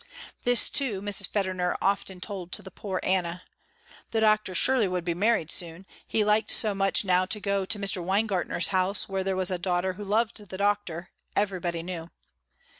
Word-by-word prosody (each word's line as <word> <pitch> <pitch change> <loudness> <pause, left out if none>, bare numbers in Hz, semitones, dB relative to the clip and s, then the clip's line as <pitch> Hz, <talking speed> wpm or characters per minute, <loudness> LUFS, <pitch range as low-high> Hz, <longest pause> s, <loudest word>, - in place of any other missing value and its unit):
This, 245 0 +5
too, 255 -9 +1
Mrs. 200 -1 +1
Federner 185 -3 -1
often 195 -1 -1
told 185 -2 -6
to - - -1
the 190 - -10
poor 190 0 -4
Anna. 180 -1 0 0.7
The 225 - 0
doctor 215 -3 +2
surely 255 0 +3
would 180 -2 -3
be 170 - 0
married 200 -3 +1
soon, 170 +2 -2 0.2
he 220 - +1
liked 210 +1 +2
so 215 -2 +2
much 195 +1 +1
now 185 0 +3
to 210 +3 -1
go 200 -1 -1
to 210 - -1
Mr. 195 -2 0
Weingartner's 190 -1 +1
house 190 +1 +1
where 195 -1 -2
there 190 0 -1
was 185 0 0
a 180 - -1
daughter 180 +1 0
who 205 +3 -8
loved 215 +1 -1
Doctor, 200 -4 -1 0.2
everybody 180 -4 -1
knew. 170 -2 -6
195 Hz, 180 wpm, -27 LUFS, 180-205 Hz, 0.7 s, This